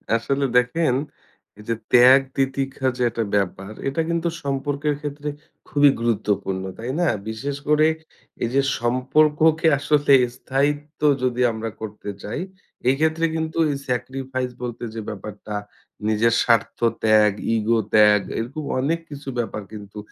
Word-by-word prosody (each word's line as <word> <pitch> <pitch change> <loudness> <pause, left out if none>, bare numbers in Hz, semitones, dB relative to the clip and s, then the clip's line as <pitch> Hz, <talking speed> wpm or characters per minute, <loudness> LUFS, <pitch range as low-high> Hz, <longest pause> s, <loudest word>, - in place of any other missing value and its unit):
আসলে 135 +4 0
দেখেন 125 +3 +2 0.7
এই 105 - -11
যে 115 - +1 0.2
ত্যাগ 125 +2 +8 0.2
তিতিক্ষা 135 0 -1
যে - - -4
একটা 115 0 -2
ব্যাপার 95 0 -1 0.2
এটা 140 +4 0
কিন্তু 170 0 0 0.2
সম্পর্কের 145 +2 -1
ক্ষেত্রে 150 0 -4 0.4
খুবই 145 0 +5
গুরুত্বপূর্ণ 105 -4 -1
তাই 120 +3 -4
না? 175 - +3 0.2
বিশেষ 135 +6 -4
করে 150 +1 +4 0.6
এই 115 - 0
যে 140 - +5 0.2
সম্পর্ককে 150 +7 +3
আসলে 145 0 +3 0.2
স্থায়িত্ব 145 +4 -2 0.2
যদি 125 -1 0
আমরা 110 0 -4
করতে 105 -1 -7
চাই 105 - -4 0.5
এই 130 - +4
ক্ষেত্রে 160 +1 +2
কিন্তু 160 0 -3
এই 140 - -1
স্যাক্রিফাইস 130 0 -3
বলতে 120 -1 -5
যে 115 - -4
ব্যাপারটা 105 0 -7 0.5
নিজের 110 +2 +3
স্বার্থ 115 -3 +2 0.3
ত্যাগ, 110 -1 +5 0.2
ইগো 115 +1 +2
ত্যাগ 105 -1 +6 0.2
এরকম 130 +7 -4 0.2
অনেক 155 +6 0
কিছু 145 -1 -10
ব্যাপার 110 -2 -3
কিন্তু 105 -1 -10
130 Hz, 135 wpm, -22 LUFS, 110-145 Hz, 0.7 s, ত্যাগ